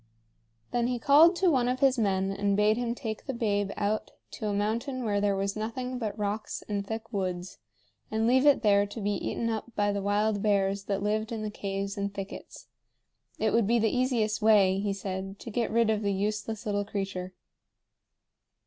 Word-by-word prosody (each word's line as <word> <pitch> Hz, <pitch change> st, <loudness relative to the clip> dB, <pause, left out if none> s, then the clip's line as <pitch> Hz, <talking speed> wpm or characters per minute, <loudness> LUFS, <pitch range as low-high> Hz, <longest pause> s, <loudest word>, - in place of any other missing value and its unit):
Then 240 Hz, -1 st, +1 dB
he 250 Hz, 0 st, -1 dB
called 300 Hz, +8 st, +6 dB
to 360 Hz, 0 st, +3 dB
one 250 Hz, -4 st, +2 dB
of 250 Hz, +1 st, 0 dB
his 265 Hz, -2 st, +3 dB
men 195 Hz, -2 st, +1 dB
and 200 Hz, 0 st, 0 dB
bade 210 Hz, +1 st, +4 dB
him 240 Hz, 0 st, -2 dB
take 220 Hz, 0 st, -6 dB
the 265 Hz, -, -3 dB
babe 205 Hz, -4 st, 0 dB
out 210 Hz, +1 st, -1 dB, 0.2 s
to 215 Hz, -, -5 dB
a -, -, 0 dB
mountain 230 Hz, +6 st, -1 dB
where 205 Hz, -2 st, +1 dB
there 200 Hz, -1 st, +2 dB
was 195 Hz, +1 st, -1 dB
nothing 250 Hz, +4 st, -4 dB
but 215 Hz, -2 st, -3 dB
rocks 210 Hz, +1 st, -3 dB
and 205 Hz, -1 st, -2 dB
thick 225 Hz, +2 st, -6 dB
woods, 185 Hz, -, -3 dB, 0.5 s
and 220 Hz, +1 st, 0 dB
leave 260 Hz, +4 st, +4 dB
it 285 Hz, -4 st, +5 dB
there 205 Hz, -1 st, +4 dB
to 205 Hz, +3 st, -8 dB
be 205 Hz, 0 st, -1 dB
eaten 230 Hz, +3 st, -2 dB
up 225 Hz, +1 st, -4 dB
by 205 Hz, 0 st, +2 dB
the 200 Hz, 0 st, -2 dB
wild 205 Hz, +1 st, +1 dB
bears 195 Hz, -1 st, +1 dB
that 200 Hz, -1 st, -2 dB
lived 215 Hz, +2 st, -1 dB
in 220 Hz, -2 st, -3 dB
the 210 Hz, -, -3 dB
caves 200 Hz, -1 st, -4 dB
and 200 Hz, 0 st, -2 dB
thickets. 195 Hz, 0 st, -8 dB, 0.7 s
It -, -, 0 dB
would 230 Hz, -3 st, +3 dB
be 235 Hz, +2 st, +3 dB
the 225 Hz, 0 st, +1 dB
easiest 235 Hz, -4 st, +1 dB
way, 200 Hz, -3 st, +5 dB
he 200 Hz, 0 st, -1 dB
said, 195 Hz, 0 st, -5 dB
to 230 Hz, -, -8 dB
get 230 Hz, +1 st, 0 dB
rid 230 Hz, -1 st, +3 dB
of 215 Hz, -1 st, 0 dB
the 200 Hz, -1 st, 0 dB
useless 210 Hz, +2 st, -2 dB
little 205 Hz, -1 st, 0 dB
creature. 195 Hz, -3 st, -4 dB
210 Hz, 200 wpm, -28 LUFS, 200-230 Hz, 0.7 s, called